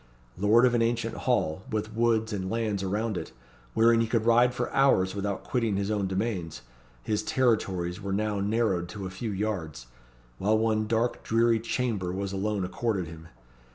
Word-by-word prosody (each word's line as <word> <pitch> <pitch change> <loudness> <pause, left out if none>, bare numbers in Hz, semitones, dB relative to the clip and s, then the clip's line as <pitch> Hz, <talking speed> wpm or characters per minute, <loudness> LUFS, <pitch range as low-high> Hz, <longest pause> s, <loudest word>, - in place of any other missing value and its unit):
Lord 110 +5 +4
of 125 - +3
an 120 - +2
ancient 115 0 0
hall, 80 +4 0
with 110 0 -3
woods 110 -1 +1
and 95 -2 -3
lands 110 -3 -1
around 105 +2 -1
it, - - -6 0.4
wherein 115 +1 +5
he 115 - +1
could 110 0 0
ride 120 +1 +5
for 125 0 -3
hours 115 -9 +3
without 100 0 -3
quitting 115 -5 0
his 100 +1 -1
own 100 -2 0
domains, 95 - -3 0.4
his 105 -1 0
territories 95 -8 0
were 100 0 -4
now 105 +1 0
narrowed 100 -4 0
to 100 0 -6
a 95 - -5
few 110 +5 -4
yards; 95 - -3 0.5
while 105 +3 +2
one 110 -1 +1
dark, 115 +2 0
dreary 115 0 +2
chamber 110 -5 -2
was 100 +1 -3
alone 100 0 -1
accorded 100 -1 -1
him. 80 -1 -11
105 Hz, 175 wpm, -28 LUFS, 95-115 Hz, 0.5 s, wherein